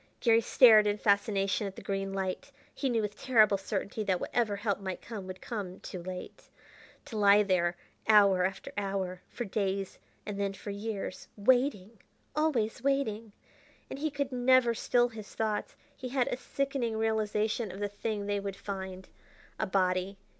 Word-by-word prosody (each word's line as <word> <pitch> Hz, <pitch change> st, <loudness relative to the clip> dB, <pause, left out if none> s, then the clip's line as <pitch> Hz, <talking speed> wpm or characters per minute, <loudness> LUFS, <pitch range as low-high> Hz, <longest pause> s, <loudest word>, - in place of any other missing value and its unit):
Garry 230 Hz, -1 st, +4 dB
stared 220 Hz, -3 st, +7 dB
in 205 Hz, 0 st, +1 dB
fascination 200 Hz, -1 st, +1 dB
at 195 Hz, -, -8 dB
the -, -, -9 dB
green 195 Hz, 0 st, -2 dB
light. 190 Hz, -1 st, -3 dB, 0.2 s
He 270 Hz, -, -1 dB
knew 230 Hz, -3 st, +1 dB
with 210 Hz, 0 st, -3 dB
terrible 215 Hz, -6 st, +4 dB
certainty 200 Hz, +2 st, -3 dB
that 185 Hz, -3 st, +1 dB
whatever 225 Hz, -4 st, 0 dB
help 200 Hz, -1 st, -1 dB
might 190 Hz, -2 st, -4 dB
come 205 Hz, -5 st, -7 dB
would 185 Hz, 0 st, -8 dB
come 200 Hz, -6 st, -5 dB
too 180 Hz, -, -7 dB
late. 180 Hz, +1 st, -8 dB, 0.6 s
To 245 Hz, -7 st, -6 dB
lie 205 Hz, 0 st, +6 dB
there 175 Hz, -3 st, +1 dB, 0.3 s
hour 200 Hz, -4 st, +6 dB
after 190 Hz, +1 st, -3 dB
hour, 195 Hz, -2 st, -2 dB
for 240 Hz, -, -5 dB
days 195 Hz, -1 st, -2 dB, 0.3 s
and 205 Hz, -1 st, -5 dB
then 200 Hz, -1 st, 0 dB
for 200 Hz, +1 st, -7 dB
years 200 Hz, -2 st, -5 dB
waiting! 230 Hz, -2 st, +2 dB, 0.4 s
always 280 Hz, -8 st, 0 dB
waiting!... 230 Hz, -6 st, -1 dB, 0.6 s
And -, -, -5 dB
he 310 Hz, +2 st, 0 dB
could 280 Hz, -2 st, -3 dB
never 250 Hz, -1 st, +4 dB
still 240 Hz, +1 st, +2 dB
his 220 Hz, -3 st, -10 dB
thoughts.... 215 Hz, -1 st, -2 dB, 0.2 s
He 255 Hz, -, -6 dB
had 255 Hz, -1 st, +1 dB
a -, -, -2 dB
sickening 270 Hz, -4 st, -2 dB
realization 220 Hz, -1 st, 0 dB
of 190 Hz, -, -9 dB
the 205 Hz, -, 0 dB
thing 205 Hz, 0 st, -4 dB
they 205 Hz, 0 st, 0 dB
would 200 Hz, -1 st, -4 dB
find. 190 Hz, -2 st, -6 dB, 0.5 s
A -, -, 0 dB
body! 185 Hz, 0 st, 0 dB
205 Hz, 170 wpm, -30 LUFS, 195-230 Hz, 0.6 s, stared